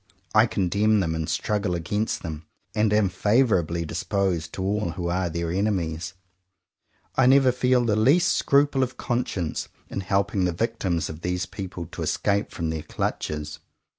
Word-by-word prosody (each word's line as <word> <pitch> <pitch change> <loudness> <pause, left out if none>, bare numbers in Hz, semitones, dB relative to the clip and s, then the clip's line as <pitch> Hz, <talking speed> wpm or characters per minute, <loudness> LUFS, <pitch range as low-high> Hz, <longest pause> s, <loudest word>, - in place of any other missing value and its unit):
I 110 +2 +6
condemn 105 +2 +2
them 80 -4 0
and 80 -1 -3
struggle 105 -4 0
against 105 +6 -2
them; 80 -1 -6 0.3
and 105 0 +2
am 105 -1 +4
favourably 90 - +2
disposed 85 -1 -1
to 95 - -3
all 100 -1 0
who 85 -1 -3
are 90 0 0
their 85 +1 -2
enemies. 90 -3 -1 1.0
I 130 -1 +4
never 135 -1 +6
feel 125 0 +2
the 110 -3 +2
least 140 +12 +4
scruple 140 -1 +3
of 130 -1 -1
conscience 110 -9 -2 0.2
in - - -3
helping 100 0 +1
the 90 - 0
victims 95 -4 -1
of 80 +1 -8
these 90 0 -1
people 90 -3 -6
to - - -7
escape 100 0 0
from 80 -2 -3
their 80 -1 -3
clutches. 75 0 -3
95 Hz, 160 wpm, -25 LUFS, 85-110 Hz, 1.0 s, I